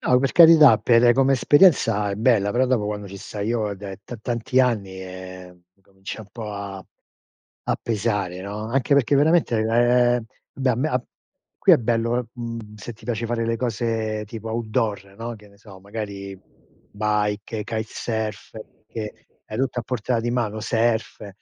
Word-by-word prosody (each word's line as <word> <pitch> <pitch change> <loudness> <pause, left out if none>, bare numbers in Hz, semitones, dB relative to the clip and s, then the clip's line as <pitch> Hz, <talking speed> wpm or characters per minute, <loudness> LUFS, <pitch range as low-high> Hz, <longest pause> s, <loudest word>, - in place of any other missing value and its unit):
No, 125 - +3
per 135 0 0
carità, 165 -3 +8
per 120 0 +5
come 135 0 +3
esperienza 130 - +4
è - - -2
bella, 110 -3 +3
però 130 +2 +2
dopo 125 -4 +1
quando 105 -1 -4
ci 100 - -9
stai 105 +1 -5
io 115 -3 0
è - - -4
da 100 0 -7
t 100 +5 -10
tanti 120 +2 0
anni, 100 -7 -1
ehm, 90 -1 -10
incomincia 95 +2 -10
un 105 - -12
po' 110 -3 -7
a 100 -2 -7 0.8
a - - +2
pesare, 100 -5 -2
no, 105 +2 -5
anche 135 +3 +1
perché 140 0 +3
veramente, 155 -3 +3
ehm, 120 +2 +3 0.3
beh 135 -1 0
a - - +2
me 140 +5 0
a 125 -4 -1 0.6
qui - - +5
è - - +8
bello, 115 +1 0
uhm, 120 -2 -5
mhmm, 105 0 -13
se 105 +4 -8
ti 115 - -18
piace 115 -1 -2
fare 115 0 -1
le 115 0 0
cose 110 -2 -2
tipo 110 +1 -7
outdoor, 110 -4 -2
no, 115 +1 -5
che 105 -1 -16
ne 100 - -21
so, 100 -3 -14
magari 100 -2 -7 0.5
bike, 105 0 -1
kitesurf, 110 -2 -4 0.3
che 105 -1 -7 0.2
hai 110 - -6
tutto 125 -1 -1
a - - -7
portata 120 0 -1
di 120 +1 -2
mano, 110 -3 -1
surf, 115 -2 -1
110 Hz, 175 wpm, -23 LUFS, 105-120 Hz, 0.8 s, carità